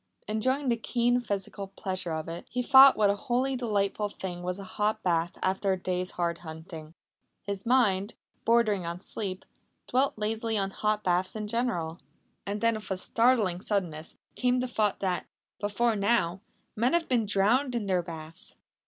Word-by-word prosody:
Enjoying 260 Hz, +6 st, 0 dB
the 235 Hz, -, +2 dB
keen 245 Hz, +1 st, +1 dB
physical 200 Hz, -3 st, -4 dB
pleasure 185 Hz, -2 st, -3 dB
of 160 Hz, 0 st, -3 dB
it, 165 Hz, +1 st, -7 dB
he 250 Hz, +1 st, -2 dB
thought 265 Hz, +1 st, +8 dB
what 205 Hz, -2 st, +4 dB
a -, -, -1 dB
wholly 255 Hz, +5 st, 0 dB
delightful 210 Hz, -3 st, 0 dB
thing 180 Hz, -3 st, -6 dB
was 180 Hz, +1 st, -3 dB
a 200 Hz, -, -7 dB
hot 210 Hz, +3 st, -1 dB
bath 170 Hz, -1 st, 0 dB
after 190 Hz, +1 st, +1 dB
a -, -, -1 dB
day's 180 Hz, 0 st, -2 dB
hard 170 Hz, -1 st, -1 dB
hunting. 160 Hz, -1 st, -9 dB, 0.5 s
His 200 Hz, +1 st, -5 dB
mind, 210 Hz, -6 st, +2 dB, 0.3 s
bordering 220 Hz, -5 st, +3 dB
on 170 Hz, +1 st, -4 dB
sleep, 190 Hz, -2 st, -4 dB, 0.4 s
dwelt 265 Hz, 0 st, +1 dB
lazily 220 Hz, +1 st, -1 dB
on 195 Hz, -1 st, 0 dB
hot 210 Hz, +1 st, -1 dB
baths 180 Hz, +2 st, +1 dB
in 215 Hz, -1 st, -3 dB
general. 210 Hz, -8 st, -2 dB, 0.5 s
And 205 Hz, +1 st, -3 dB
then 230 Hz, 0 st, +3 dB
with 215 Hz, -1 st, -7 dB
a 190 Hz, -, -1 dB
startling 220 Hz, -4 st, +2 dB
suddenness 170 Hz, -7 st, -3 dB, 0.2 s
came 250 Hz, 0 st, +1 dB
the 255 Hz, -, -1 dB
thought 215 Hz, -4 st, 0 dB
that, 185 Hz, -2 st, -1 dB, 0.3 s
before 215 Hz, +3 st, +1 dB
now, 200 Hz, -3 st, +1 dB, 0.3 s
men 240 Hz, +6 st, +1 dB
had 340 Hz, -1 st, +2 dB
been 235 Hz, -4 st, +1 dB
drowned 235 Hz, +7 st, +2 dB
in 230 Hz, -3 st, -1 dB
their 185 Hz, -2 st, +1 dB
baths! 165 Hz, -1 st, -9 dB
205 Hz, 170 wpm, -28 LUFS, 180-235 Hz, 0.5 s, thought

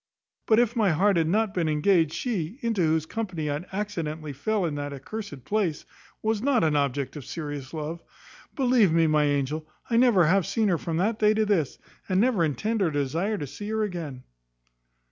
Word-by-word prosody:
But 220 Hz, -, +5 dB
if 240 Hz, 0 st, +3 dB
my 215 Hz, -4 st, +3 dB
heart 190 Hz, +5 st, +3 dB
had 165 Hz, -1 st, +2 dB
not 210 Hz, +3 st, +1 dB
been 170 Hz, -3 st, 0 dB
engaged, 160 Hz, +1 st, +3 dB
she, 210 Hz, -4 st, -3 dB
into 225 Hz, -5 st, 0 dB
whose 160 Hz, -1 st, +2 dB
company 175 Hz, -7 st, -3 dB
I 145 Hz, +3 st, -3 dB
accidently 165 Hz, -7 st, -4 dB
fell 200 Hz, +8 st, -1 dB
at 160 Hz, -, -2 dB
that 145 Hz, -2 st, -6 dB
cursed 200 Hz, -, -7 dB
place, 195 Hz, -5 st, -1 dB, 0.4 s
was 220 Hz, -1 st, 0 dB
not 260 Hz, -4 st, +2 dB
an 155 Hz, -2 st, +2 dB
object 140 Hz, -1 st, -1 dB
of 145 Hz, -, -7 dB
serious 145 Hz, -4 st, -6 dB
love. 160 Hz, +1 st, -5 dB, 0.5 s
Believe 245 Hz, -, +4 dB
me, 165 Hz, 0 st, +4 dB
my 155 Hz, -1 st, +3 dB
angel, 145 Hz, +2 st, -1 dB, 0.2 s
I 230 Hz, -, +3 dB
never 235 Hz, -8 st, +5 dB
have 185 Hz, +2 st, +3 dB
seen 220 Hz, -3 st, +1 dB
her 170 Hz, -4 st, +1 dB
from 165 Hz, -1 st, -3 dB
that 210 Hz, +5 st, 0 dB
day 215 Hz, 0 st, +4 dB
to 215 Hz, 0 st, +2 dB
this; 175 Hz, -10 st, 0 dB, 0.3 s
and 185 Hz, 0 st, +2 dB
never 225 Hz, -5 st, +3 dB
intend 210 Hz, +9 st, -1 dB
or 180 Hz, -, +3 dB
desire 160 Hz, +9 st, -1 dB
to 145 Hz, -, -4 dB
see 205 Hz, +9 st, -7 dB
her 220 Hz, 0 st, 0 dB
again." 165 Hz, -10 st, -5 dB
170 Hz, 195 wpm, -26 LUFS, 150-215 Hz, 0.5 s, But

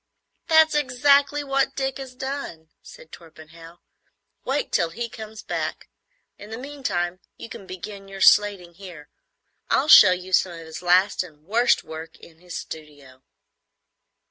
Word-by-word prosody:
"That's 320 Hz, -1 st, +5 dB
exactly 285 Hz, +1 st, +2 dB
what 275 Hz, -1 st, 0 dB
Dick 270 Hz, -1 st, -3 dB
has 260 Hz, -2 st, -9 dB
done," 265 Hz, -, -6 dB
said 160 Hz, -, -15 dB
Torpenhow. 165 Hz, +1 st, -14 dB, 0.7 s
"Wait 275 Hz, +3 st, -2 dB
till 170 Hz, -, +1 dB
he 235 Hz, +7 st, -5 dB
comes 220 Hz, -1 st, -10 dB
back. -, -, -4 dB, 0.5 s
In 205 Hz, -, -11 dB
the 225 Hz, -, -6 dB
meantime, 245 Hz, -10 st, -4 dB, 0.2 s
you -, -, -10 dB
can 195 Hz, -, -10 dB
begin 195 Hz, +2 st, -9 dB
your 195 Hz, 0 st, -10 dB
slating 195 Hz, -3 st, +4 dB
here. 170 Hz, -5 st, -12 dB, 0.6 s
I'll 280 Hz, +3 st, +1 dB
show 205 Hz, -, +10 dB
you 185 Hz, +1 st, -4 dB
some 180 Hz, -1 st, +2 dB
of 165 Hz, -1 st, -10 dB
his 160 Hz, +1 st, -9 dB
last 185 Hz, +3 st, +3 dB
and 155 Hz, -5 st, -11 dB
worst 235 Hz, +6 st, +2 dB
work 160 Hz, 0 st, -9 dB
in 160 Hz, -1 st, -17 dB
his 180 Hz, -1 st, -8 dB
studio." 145 Hz, -4 st, -11 dB
195 Hz, 145 wpm, -23 LUFS, 165-265 Hz, 0.7 s, show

